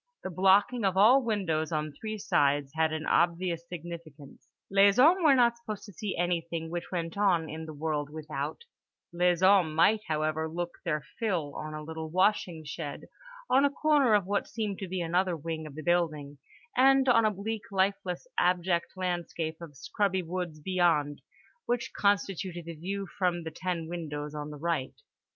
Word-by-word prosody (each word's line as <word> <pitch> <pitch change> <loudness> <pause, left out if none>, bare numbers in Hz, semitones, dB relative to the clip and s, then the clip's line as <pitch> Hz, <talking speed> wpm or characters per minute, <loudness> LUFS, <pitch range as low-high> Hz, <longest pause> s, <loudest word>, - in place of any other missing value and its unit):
The 190 - -4
blocking 195 +6 +3
of 190 -1 +1
all 240 +7 +7
windows 185 -9 -1
on 155 -1 -2
three 215 +7 -5
sides 145 -7 +1
had 160 0 +1
an 155 0 -3
obvious 170 0 +1
significance: 165 -4 -9 0.2
les 200 0 +5
hommes 330 +9 +6
were 290 -4 +6
not 235 -2 +3
supposed 215 -3 -7
to 205 - -12
see 200 +3 -4
anything 170 -2 -2
which 175 0 -5
went 170 +1 -3
on 175 -6 +3
in 160 +1 -7
the 155 - -7
world 150 -1 -2
without; 150 - -5 0.5
les 175 0 +2
hommes 185 -5 +5
might, 210 +7 +4
however, 155 0 -1
look 175 +1 -5
their 150 -5 -1 0.2
fill 175 -10 -1
on 155 0 -6
a 155 - -6
little 160 0 -6
washing 180 -2 +1
shed, 150 -1 -6 0.5
on 270 +2 +4
a 285 - +4
corner 285 -5 +3
of 200 -3 +2
what 200 +1 -1
seemed 210 -4 -3
to 195 - -5
be 185 0 -3
another 175 +1 0
wing 160 0 -5
of 145 - -11
the 155 - -7
building, 155 -4 0 0.4
and 270 +1 +5
on 230 -2 +5
a 215 - +4
bleak 210 +2 -4
lifeless 190 - -1
abject 175 -1 +1
landscape 175 -3 -3
of 150 -5 -10
scrubby 190 +6 -1
woods 175 -2 -4
beyond—which 175 - -1
constituted 190 -3 0
the 170 - -6
view 195 +5 -4
from 175 -2 +1
the 160 - -5
ten 170 -1 -3
windows 150 -3 -5
on 150 0 -5
the 150 - -8
right. 160 -4 -2
175 Hz, 175 wpm, -29 LUFS, 155-200 Hz, 0.5 s, all